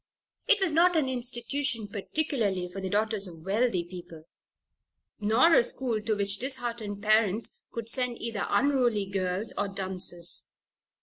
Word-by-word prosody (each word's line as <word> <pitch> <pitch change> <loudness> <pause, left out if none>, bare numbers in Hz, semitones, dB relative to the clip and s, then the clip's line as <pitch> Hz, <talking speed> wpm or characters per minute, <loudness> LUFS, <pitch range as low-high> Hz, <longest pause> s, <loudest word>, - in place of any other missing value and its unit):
It 450 -4 +5
was 380 -4 +1
not 345 +3 +4
an 305 -4 +2
institution 245 -1 -1
particularly 205 - -1
for 185 +2 -8
the 190 - -3
daughters 210 -1 0
of 165 -3 -12
wealthy 200 -2 +1
people, 170 -2 -11 1.0
nor 225 +10 +4
a - - +6
school 235 -3 -1
to 215 0 0
which 200 0 +1
disheartened 235 -6 -2
parents 215 0 +2
could 230 -1 -6
send 250 0 0
either 230 -3 -3
unruly 240 -3 +2
girls, 190 +2 -2
or 205 - 0
dunces. 185 -3 0
215 Hz, 140 wpm, -28 LUFS, 195-250 Hz, 1.0 s, a